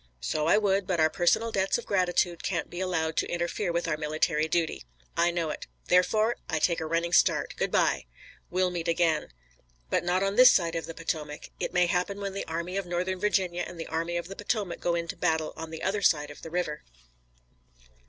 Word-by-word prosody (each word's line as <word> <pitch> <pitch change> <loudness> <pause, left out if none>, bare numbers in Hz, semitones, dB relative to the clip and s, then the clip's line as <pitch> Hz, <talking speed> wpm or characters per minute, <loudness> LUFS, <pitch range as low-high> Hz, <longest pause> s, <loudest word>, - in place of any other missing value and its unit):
"So 150 - -1
I 170 - +5
would, 200 -2 +1
but 180 -4 0
our 155 0 +4
personal 175 +8 +2
debts 195 -2 +1
of 240 - -7
gratitude 180 -3 +1
can't 170 -5 -2
be 175 - -6
allowed 165 -4 -1
to - - +1
interfere 175 +2 -1
with 170 0 -1
our 155 -2 0
military 155 0 0
duty." 165 - -1 0.3
"I 170 +1 +3
know 170 -3 -1
it. - - -7 0.2
Therefore 215 +6 +3
I 160 - 0
take 170 +2 +2
a 160 - -3
running 170 +2 0
start. - - +3
Good - - -1
by." - - +2 0.4
"We'll 185 0 +1
meet 170 -1 -3
again." 165 -2 +2 0.6
"But - - +2
not 180 +2 +1
on 195 +1 -1
this 255 0 +10
side 170 -3 +2
of 165 -1 -3
the 165 - -7
Potomac. 155 -2 -4
It - - -2
may 180 0 +3
happen 180 +3 -1
when 200 -1 -4
the 195 - -4
Army 170 +3 -3
of 195 -2 -3
Northern 180 +2 -1
Virginia 185 -3 +1
and 175 - -10
the 165 - -4
Army 165 +2 -2
of 170 - -4
the 195 - -8
Potomac 205 -3 -2
go 175 -1 0
into 170 0 -3
battle 160 -1 0
on 160 - -7
the 160 0 -7
other 200 +2 0
side 150 -6 +2
of 145 - -12
the 165 - -8
river." 160 -3 -2
175 Hz, 215 wpm, -28 LUFS, 160-185 Hz, 0.6 s, this